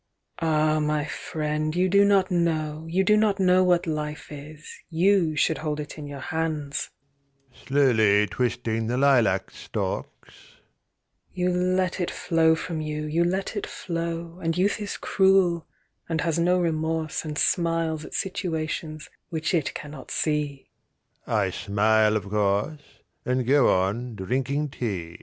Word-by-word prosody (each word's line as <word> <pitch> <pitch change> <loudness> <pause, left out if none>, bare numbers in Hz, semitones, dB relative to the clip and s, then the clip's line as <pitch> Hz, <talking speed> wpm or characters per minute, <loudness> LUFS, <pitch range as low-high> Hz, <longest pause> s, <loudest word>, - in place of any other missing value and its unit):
"Ah, 155 -1 +2
my 150 -1 0
friend, 155 +1 -3
you 180 +1 +3
do 200 +2 +5
not 200 -2 +3
know, 160 -2 0
you 185 +3 +2
do 210 +2 +4
not 210 -2 +2
know 185 0 +4
What 180 -1 +3
life 150 -2 -4
is, 150 +2 -10 0.2
you 175 -1 +3
should 155 +1 +1
hold 150 -1 -3
it 150 - -6
in 145 - -7
your 140 -1 -7
hands"; 155 -3 -2 0.8
(Slowly 110 -7 +4
twisting 115 -1 -1
the 125 +2 -1
lilac 120 -9 +3
stalks) - - -5 1.0
"You 180 0 +1
let 185 +1 0
it 175 - -1
flow 160 -1 +2
from 160 -1 -4
you, 150 0 -3
you 160 +3 +1
let 190 +4 -1
it 205 - -3
flow, 170 0 -4
And 165 0 -1
youth 200 +3 +1
is 205 - -4
cruel, 190 -4 +3 0.4
and 160 -1 0
has 170 -1 0
no 180 +2 +3
remorse 160 -1 -1
And 150 -2 -5
smiles 165 -3 +1
at - - -8
situations 160 -5 -3 0.2
which 160 +1 -2
it 160 -5 0
cannot 145 -3 -8
see." 150 -3 -2 0.6
I - - +1
smile, 110 +1 +2
of 100 -2 -6
course, 105 +8 0 0.4
And 125 -1 0
go 140 +1 +4
on 105 +6 0
drinking 135 +9 -1
tea. 95 -10 -4
155 Hz, 145 wpm, -25 LUFS, 140-170 Hz, 1.0 s, do